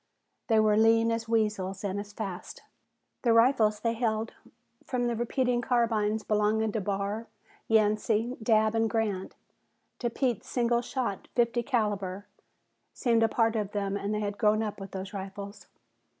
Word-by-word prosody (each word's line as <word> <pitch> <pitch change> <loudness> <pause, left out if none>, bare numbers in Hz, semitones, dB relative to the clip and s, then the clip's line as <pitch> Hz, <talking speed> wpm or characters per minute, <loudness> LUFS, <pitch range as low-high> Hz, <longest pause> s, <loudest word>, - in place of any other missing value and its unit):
They 225 -2 +4
were 215 -1 +4
lean 225 +1 +4
as 230 0 -3
weasels, 210 -4 0
and 200 0 -2
as 205 0 -7
fast. 195 -4 -7 0.6
The 235 -3 +3
rifles 230 -3 +4
they 230 -1 +1
held, 225 -1 -1 0.5
from 250 -2 -1
the 240 -1 0
repeating 240 +1 0
carbines 220 -3 +1
belonging 215 +1 +1
to 220 - -2
Barr, 200 +3 -2 0.4
Yancey, 220 +2 +2
Dabb 220 -1 +3
and 225 0 +1
Grant, 210 -4 -2 0.6
to 240 - 0
Pete's 240 -2 -2
single 240 -1 +1
shot 240 -5 -3
fifty 240 0 +2
caliber, 205 -6 -1 0.7
seemed 230 -2 +2
a 225 - +4
part 225 -1 +2
of 210 -2 -2
them 200 -1 -1
and 200 0 -3
they 210 0 -1
had 205 -1 -3
grown 215 0 +3
up 210 -1 -4
with 195 0 -7
those 190 +1 -6
rifles. 200 +1 -7
220 Hz, 155 wpm, -28 LUFS, 205-230 Hz, 0.7 s, They